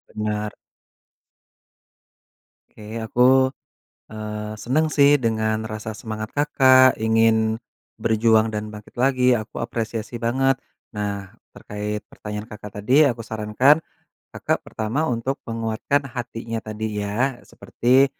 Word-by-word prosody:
Benar. 105 0 -2 2.2
Oke 110 +2 -8
aku, 115 +2 -2 0.9
eee, 105 0 -5
senang 155 +6 +1
sih 145 0 +6
dengan 110 -3 0
rasa 110 0 -6
semangat 110 -1 -5
Kakak 130 -3 +6
ingin 110 0 +3 0.4
berjuang 110 0 +3
dan 105 0 -3
bangkit 105 0 -11
lagi 125 -1 +4
aku 110 -3 -4
apresiasi 115 0 -4
banget, 135 +3 +1 0.3
nah 100 -2 -4 0.2
terkait 105 0 -5
pertanyaan 105 0 -7
Kakak 105 -2 -10
tadi 125 +9 +4
aku 115 -2 -5
sarankan, 115 +8 +3 0.5
Kakak - - -2
pertama 120 +9 -2
untuk 125 +3 -2
menguatkan 115 +5 -1
hatinya 115 -2 -4
tadi 110 -1 -4
ya 120 +5 -1
seperti, 130 +3 +2
110 Hz, 110 wpm, -23 LUFS, 105-125 Hz, 2.2 s, sih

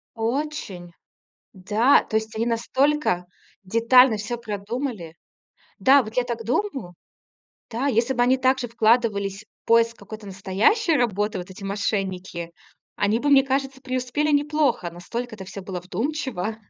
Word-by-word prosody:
Очень. 230 - -3 0.6
Да, 210 +8 +3
то 220 - -3
есть 220 0 -2
они 230 - 0
настолько 240 -3 +1 0.4
детально 230 +4 +5
всё 215 +3 -4
продумали. 215 - -5 0.7
Да, 270 0 +6
вот 220 0 -10
я 250 - +4
так 235 -2 -4
думаю. 250 - -2 0.8
Да, 240 +5 -2
если 245 0 +1
бы 245 - +2
они 255 +2 +4
также 260 -1 +1
вкладывались 220 -3 +1
в - - -56
поиск 230 0 +4
какой-то 210 +1 -10
настоящей 200 - +1
работы, 210 -5 0
вот 180 +1 -8
эти 190 +1 -10
мошенники, 190 -4 -3 0.5
они 210 +2 +1
бы, 290 - -1
мне 275 -1 +7
кажется, 270 0 -2
преуспели 255 +3 -1
неплохо, 290 - +1
настолько 230 +8 -6
это 195 -3 -9
всё 190 +1 -8
было 185 -2 -5
вдумчиво. 225 - -3
230 Hz, 140 wpm, -24 LUFS, 200-260 Hz, 0.8 s, мне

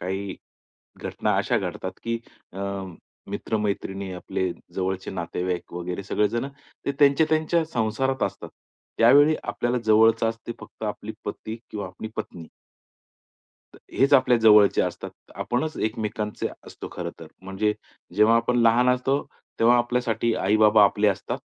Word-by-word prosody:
काही, 95 +2 -4 0.7
घटना - - -1
अशा - - +1
घडतात 95 0 -4
की 115 0 -1 0.3
अ, 95 - -7 0.7
मित्र-मैत्रिणी, 100 -3 -3
आपले 90 0 -2 0.2
जवळचे 95 0 -2
नातेवाईक 90 0 -4
वगैरे 90 +2 -4
सगळे 105 +1 +1
जण 120 +4 -2 0.4
ते 140 - +1
त्यांच्या-त्यांच्या 155 +3 +3
संसारात 130 +1 -1
असतात. - - -5 0.5
त्यावेळी 145 +7 +6
आपल्याला 120 +1 -1
जवळच 110 +1 +5
असते 115 +1 -3
फक्त - - -14
आपली - - -4
पती 110 +1 -5
किंवा 105 -3 -4
आपली 95 +4 -8
पत्नी. 95 -6 -6 1.3
तर - - -14 0.2
हेच 140 +2 +4
आपल्या 130 -2 +5
जवळचे 105 -2 +6
असतात. - - -4 0.2
आपणच 155 +6 -2
एकमेकांचे 110 -1 -2 0.2
असतो - - -9
खरं - - -4
तर. - - -9 0.2
म्हणजे, 95 +3 0 0.4
जेव्हा 110 +2 +5
आपण 120 +1 +1
लहान 120 +2 +4
असतो, 130 +3 +1 0.4
तेव्हा 120 +2 +5
आपल्यासाठी 120 -2 0
आई-बाबा 105 +1 +5
आपले 105 +1 +3
असतात. 100 - -2
110 Hz, 130 wpm, -25 LUFS, 100-125 Hz, 1.3 s, त्यावेळी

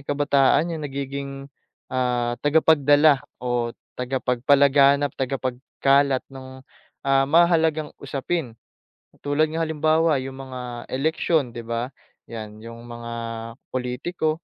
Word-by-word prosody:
kabataan 145 +3 +2
'yong 160 -2 -5
nagiging, 140 0 -5 0.6
ah, 125 -2 0
tagapagdala 145 -1 +4 0.2
o 120 -1 -1 0.3
tagapagpalaganap, 140 +2 +3
tagapagkalat 135 +1 0
nung, 130 0 -11 0.4
ah, 135 0 +3
mahahalagang 160 -2 +3
usapin. 135 -4 -3 0.6
Katulad 145 +2 +1
nga 160 +1 -2
halimbawa 160 -1 +2
'yong 135 0 -7
mga 130 -1 -8 0.3
eleksyon 155 0 +1
'di 120 - -6
ba, 115 +2 -3 0.4
'yan, 110 -2 -8
'yong 115 +1 -10
mga 120 0 -7 0.6
politiko, 155 +6 -2
135 Hz, 100 wpm, -23 LUFS, 125-155 Hz, 0.6 s, tagapagdala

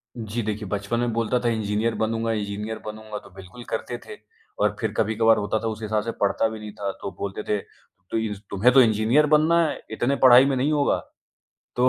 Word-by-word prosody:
जी, 115 0 -4
देखिए, 105 -1 -3
बचपन 100 +3 -2
में 120 -1 0
बोलता 115 +2 0
था 120 -1 0
इंजीनियर 110 +1 -1
बनूँगा, 115 +1 -1
इंजीनियर 105 +1 -3
बनूँगा 110 0 -7
तो 100 - -14
बिल्कुल 95 +6 -11
करते 120 +2 -3
थे - - -9 0.4
और 105 0 +2
फिर 110 -2 -1
कभी-कभार 110 +1 +3
होता 105 +1 -1
था - - 0
उस 110 0 -4
हिसाब 105 0 -1
से 115 - -3
पढ़ता 100 +2 +2
भी 110 0 -7
नहीं 105 -1 -8
था। 100 -1 -3
तो 100 - -4
बोलते 100 +1 -4
थे 105 - 0 0.5
तो - - 0
इस 105 -3 -2
"तुम्हें 105 +6 +3
तो 135 - +8
इंजीनियर 115 +6 +3
बनना 160 +3 +4
है, - - -4
इतने 120 +5 0
पढ़ाई 130 +1 +9
में 135 -1 +1
नहीं 140 +4 +1
होगा।" 145 -2 +2 0.8
तो 125 +1 +4
110 Hz, 210 wpm, -24 LUFS, 105-120 Hz, 0.8 s, पढ़ाई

